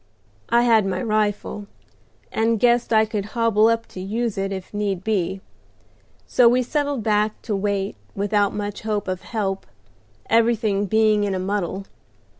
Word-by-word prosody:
I 235 +1 +4
had 225 -3 +4
my 190 - -1
rifle, 210 -2 -1 0.6
and 225 0 +1
guessed 240 0 +3
I 220 -1 +5
could 215 -2 -3
hobble 225 -2 +4
up 230 0 +1
to - - -9
use 220 +3 -2
it 195 0 -2
if 190 0 -6
need 200 -3 -2
be; 190 -3 -1 0.8
so 245 -2 +5
we 250 +1 +2
settled 285 -2 -1
back 210 0 +1
to 215 - -2
wait 195 - -1 0.2
without 205 0 +1
much 205 -1 -4
hope 210 -2 -2
of 185 -1 -3
help, 195 -4 -3 0.6
everything 225 -3 +2
being 215 0 +3
in 200 -2 -1
a - - -2
muddle. 195 0 -2
210 Hz, 155 wpm, -22 LUFS, 195-230 Hz, 0.8 s, I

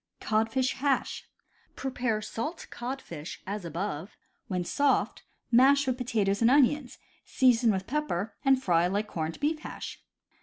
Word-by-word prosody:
Codfish 225 +4 +1
Hash. 275 0 -1 0.2
— - - -36
Prepare 245 -5 -2
salt 305 +11 -4
codfish 240 - -6
as 205 +1 -4
above. 170 +1 -4 0.3
When 180 -2 -1
soft, 280 +10 +1 0.3
mash 275 +3 +6
with 255 -1 0
potatoes 215 -5 0
and 230 - +5
onions, 275 0 +3 0.3
season 245 -3 +3
with 190 -2 0
pepper, 225 -8 -2
and 270 -2 +4
fry 175 -7 +2
like 200 +3 -1
corned 165 -5 -4
beef 305 +2 0
hash. - - -8
230 Hz, 140 wpm, -29 LUFS, 195-270 Hz, 0.3 s, mash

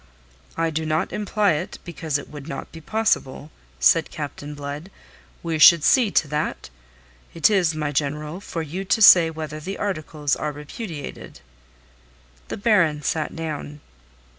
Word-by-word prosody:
"I 165 0 0
do 160 +1 -2
not 155 +2 -1
imply 210 -1 +1
it, 150 - -3
because 165 -4 -2
it 140 - -9
would 145 -1 -10
not 140 -3 -7
be 165 - -11
possible," 155 -7 -1 0.3
said - - +4
Captain 145 0 -7
Blood. 145 +4 -7 0.5
"We 165 -2 -2
should 165 0 +8
see 250 - +4
to 165 - +2
that. 150 - -3 0.6
It 165 +5 +4
is, 180 -6 +2
my 150 -1 -2
General, 150 +4 -2
for 165 -4 -5
you 170 +6 -5
to 195 - +1
say 170 -4 +9
whether 155 -1 -6
the 190 +6 -6
articles 155 -7 -2
are 150 - -3
repudiated." 150 +2 -8 1.1
The - - -5
Baron 175 -9 +2
sat 155 +2 -2
down. 150 -2 -5
155 Hz, 150 wpm, -23 LUFS, 150-175 Hz, 1.1 s, say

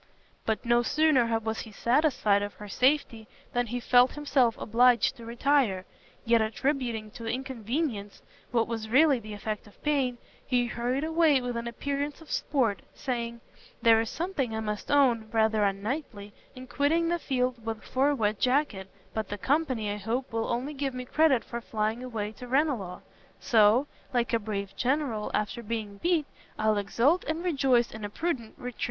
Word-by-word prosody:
But 220 +1 -1
no 240 0 +4
sooner 255 -4 +3
was 220 0 -3
he 220 - -7
satisfied 235 -3 +2
of 205 0 -4
her 210 - -9
safety, 250 -1 +1 0.3
than 245 0 0
he 245 +2 -3
felt 245 +1 +4
himself 275 -5 +2
obliged 240 +1 +3
to 230 -1 -10
retire; 235 -6 +1 0.4
yet 230 -1 +4
attributing 225 -1 -1
to 230 +1 -8
inconvenience 245 -3 -3 0.3
what 230 -2 +1
was 225 -1 -4
really 275 +2 +5
the 215 -1 -9
effect 210 +1 -5
of 205 - -19
pain, 275 -5 +1 0.3
he 245 -2 +1
hurried 245 +3 -2
away 320 -3 +3
with 245 -1 -4
an 235 0 -3
appearance 280 +4 -3
of 320 - -13
sport, 230 - 0
saying, 235 -2 -3 0.4
"There 225 -1 +6
is 225 - -3
something 300 -10 -2
I - - -2
must 210 -1 -4
own, 245 -6 +3
rather 220 -1 +2
unknightly 205 +1 -3 0.2
in 255 0 -9
quitting 295 +6 +1
the 345 0 0
field 255 -4 0 0.3
for 270 +2 +1
a 290 - +1
wet 215 -4 0
jacket, 250 -8 +1 0.2
but 220 -2 -2
the 205 - -4
company, 255 -4 0
I 205 - -3
hope, 225 +5 -3
will 225 0 -1
only 250 +5 -2
give 275 -2 -3
me 250 0 -5
credit 290 -3 +3
for 235 0 -6
flying 220 +1 -2
away 220 -4 -4
to 250 - -8
Ranelagh. 250 - 0 0.4
So 225 +2 +4 0.3
"Like 240 0 +1
a 230 - +3
brave 200 -2 -4
general 250 -3 0
after 210 +2 -2
being 215 -3 -4
beat, 340 -3 +1 0.3
I'll 215 -1 +2
exult 235 - +2
and 315 +2 -2
rejoice 265 -8 +2
in 220 -1 -8
a 205 - -3
prudent 250 -3 -3
retreat." 250 0 -7
240 Hz, 170 wpm, -28 LUFS, 220-275 Hz, 0.4 s, There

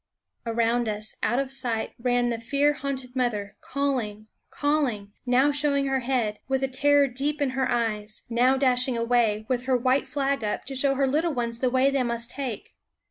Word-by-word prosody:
Around 230 0 +1
us, 210 +1 -5
out 240 - +1
of 270 -1 -1
sight, 240 -5 -1
ran 245 0 +1
the 230 -1 -2
fear 280 +5 +2
haunted 265 -2 -4
mother, 215 -6 -1
calling, 240 -7 -2 0.2
calling; 275 -9 -1 0.2
now 260 +4 +4
show 290 0 +1
ing 280 0 +1
her 270 -1 +1
head, 240 -5 -1
with 265 0 0
the 270 - +1
terror 285 +2 +4
deep 280 +4 -1
in 280 -3 +1
her 260 0 -1
eyes; 215 -3 -2
now 245 +3 +3
dashing 255 -2 +2
away, 230 -2 +1
with 250 -1 -1
her 260 -1 +2
white 255 +3 +1
flag 275 -3 -1
up, 210 - -2
to 270 - -5
show 275 +1 +2
her 275 0 +2
little 305 +4 0
ones 235 -1 -2
the 255 - +1
way 260 +2 +3
they 275 -1 +1
must 235 -1 -2
take. 260 -7 -5
255 Hz, 190 wpm, -26 LUFS, 235-275 Hz, 0.2 s, now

